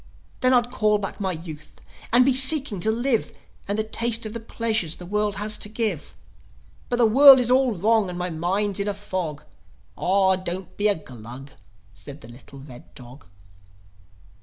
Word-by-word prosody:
Then 255 - +2
I'd 245 -1 +2
call 215 -3 +1
back 200 +1 -6
my 190 -2 -2
youth, 160 -3 -10 0.3
and 245 +2 +5
be 270 - +3
seeking 265 - +4
to 215 - 0
live, 235 +1 -1 0.4
And 200 +1 -2
to 220 - 0
taste 230 +1 -1
of 215 - -6
the 230 - -5
pleasures 220 -7 -2
the 180 - -11
world 210 +2 -2
has 210 +1 0
to 210 - -1
give. 215 -7 -4 0.7
But 245 - 0
the 240 -1 +3
world 270 +4 +8
is 245 -1 0
all 255 -2 +3
wrong, 215 +2 +1
and 175 - -6
my 180 0 -4
mind's 190 +5 -1
in 200 - -2
a 205 - -2
fog!" 185 -7 -5 0.5
"Aw, 190 0 +2
don't 185 0 -6
be 205 - 0
a 205 - +2
Glug!" 130 -1 -11 0.4
said 145 +7 -12
the - - -12
little 130 +3 -15
red 135 -3 -14
dog. 125 -5 -14
205 Hz, 185 wpm, -23 LUFS, 170-230 Hz, 0.7 s, world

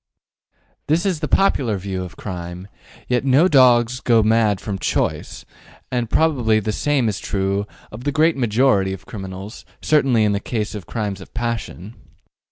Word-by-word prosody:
This 160 +5 +1
is 185 -5 0
the 150 - -2
popular 130 - +2
view 95 -1 -4
of 90 -3 -10
crime; 90 -1 -7 0.4
yet 125 0 +1
no 135 +6 +4
dog 125 -6 +5
goes 115 -3 +4
mad 110 -3 +2
from 100 -2 -5
choice, - - -2 0.5
and 120 -3 -1
probably 125 -9 +2
the 110 0 -2
same 135 +2 0
is 105 -2 -2
true 100 +1 -2 0.2
of 110 +3 -9
the 145 - 0
great 160 +3 +3
majority 115 -5 +2
of 85 -5 -9
criminals, 95 +1 -8 0.2
certainly 135 -7 +2
in 105 - +2
the 100 - 0
case 110 -1 -3
of 105 -4 -8
crimes 105 -4 -4
of - - -14
passion. 115 -4 -4
110 Hz, 165 wpm, -20 LUFS, 100-130 Hz, 0.5 s, dog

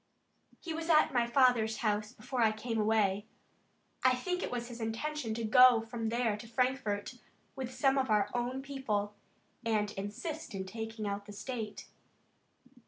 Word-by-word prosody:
"He 335 - -5
was 325 +1 -4
at 310 -3 +5
my 240 -2 +2
father's 235 -3 +3
house 210 0 0
before 245 +3 -4
I 220 -1 +5
came 225 +1 -3
away. 210 -1 +2 0.8
I 255 0 +5
think 360 +8 -2
it - - -2
was 240 -1 -3
his 240 -1 -8
intention 225 +2 -2
to 230 - -3
go 245 +2 +7
from 225 0 -4
there 235 -2 +1
to 230 - -10
Frankfort 245 -2 -1 0.4
with 260 -2 -4
some 270 0 +2
of 260 -2 0
our 210 -2 +3
own 250 +2 -2
people, 220 -7 -2 0.5
and 215 -2 0
assist 225 - -5
in 190 -1 -3
taking 220 +2 -5
out 200 0 -4
the 205 - -8
state." 215 0 -5
230 Hz, 165 wpm, -32 LUFS, 215-255 Hz, 0.8 s, go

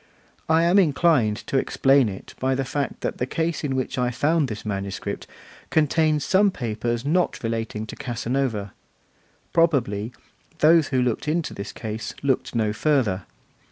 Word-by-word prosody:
I 160 +1 +4
am 175 +4 +5
inclined 145 - +3
to 135 - +1
explain 135 -2 +3
it 95 - -9
by 130 0 +1
the 135 0 -1
fact 140 +2 -3
that - - -3
the 125 - -1
case 160 +3 -2
in 135 -3 -1
which 130 0 -2
I 125 0 +2
found 145 +5 +1
this 110 -2 -6
manuscript 100 -2 -4 0.4
contains 155 -1 +2
some 200 +2 +4
papers 120 - -3
not 175 0 +1
relating 115 -1 -3
to - - -8
Casanova. 120 -4 -2 0.8
Probably, 125 -10 +2 0.5
those 160 0 +5
who 130 -2 +1
looked 125 +3 -1
into 160 +1 -1
this 100 0 -6
case 110 0 -6
looked 135 -3 0
no 110 -2 +1
further. 115 - +1
130 Hz, 155 wpm, -24 LUFS, 110-155 Hz, 0.8 s, am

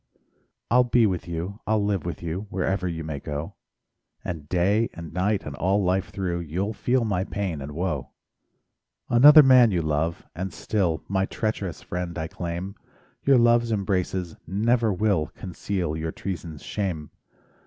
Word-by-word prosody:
I'll 125 +1 +6
be 120 -1 +3
with 90 -4 -1
you, 85 +5 -4
I'll 105 -1 +2
live 100 -4 -1
with 85 - -5
you, 90 +5 -4
Wherever 95 -1 -1
you 80 -2 -4
may 75 -2 -4
go; 75 +2 -5 0.7
And 80 -4 -5
day 100 +6 +2
and 85 -2 -8
night, 95 +3 0
and 75 - -6
all 100 +3 +2
life 95 +1 +1
through 90 -3 -2
You'll 90 +6 -2
feel 125 +2 +1
my 95 -4 0
pain 90 -5 -3
and 70 +2 -6
woe. 90 +3 -2 1.0
Another 145 +6 +9
man 130 -3 +7
you 90 -5 0
love, 80 +2 -1
and 95 +2 -4
still 90 -7 -1
My 95 0 0
treacherous 105 -5 -3
friend 90 -1 -4
I 80 -1 -2
claim; 85 +3 -5 0.5
Your 135 -2 +6
love's 120 -1 +4
embraces 95 -4 -1
never 115 +5 +2
will 95 -5 +1
Conceal 90 -2 -3
your 80 0 -3
treason's 85 -6 -6
shame. 85 -8 -3
95 Hz, 155 wpm, -25 LUFS, 85-105 Hz, 1.0 s, Another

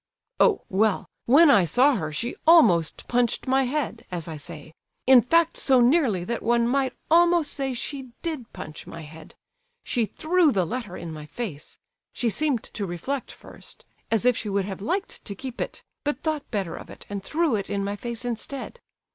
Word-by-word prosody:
"Oh, 435 - +4
well, 210 +1 +1 0.2
when 290 +5 +7
I 200 -8 +6
saw 255 - +4
her 155 -8 -3
she 230 +11 -3
almost 180 - +5
punched 245 -1 +1
my 265 +1 +2
head, 280 0 -2
as 175 -3 -4
I 160 - -5
say; 155 0 -9 0.3
in 255 -1 +8
fact 330 +7 +2
so 260 -2 +4
nearly 245 - +3
that 230 +5 -3
one 235 +1 +2
might 265 +1 +1 0.2
almost 340 -2 +4
say 270 -3 -2
she 270 +1 -5
did 310 -9 -4
punch 155 0 -9
my 165 - -8
head. 155 +1 -12 0.5
She 235 -3 0
threw 325 - +2
the 190 -6 +1
letter 220 -2 -5
in 165 -2 -7
my 150 -1 -9
face; 155 -3 -7 0.4
she 235 -2 0
seemed 275 +1 0
to 200 -3 -5
reflect 235 +11 -4
first, - - -11 0.2
as 225 0 +1
if 250 -1 +5
she 215 - -4
would 200 -1 0
have 195 -1 -6
liked 370 - -3
to 200 - -6
keep 260 0 -7
it, - - -5 0.2
but 290 -1 -2
thought 310 -3 -2
better 195 -7 -2
of - - -10
it - - -11
and 200 -1 -5
threw 310 +1 +1
it 200 -2 -3
in 200 -1 -1
my 200 +1 -2
face 235 +2 -5
instead. 250 - -5
240 Hz, 190 wpm, -25 LUFS, 195-280 Hz, 0.5 s, in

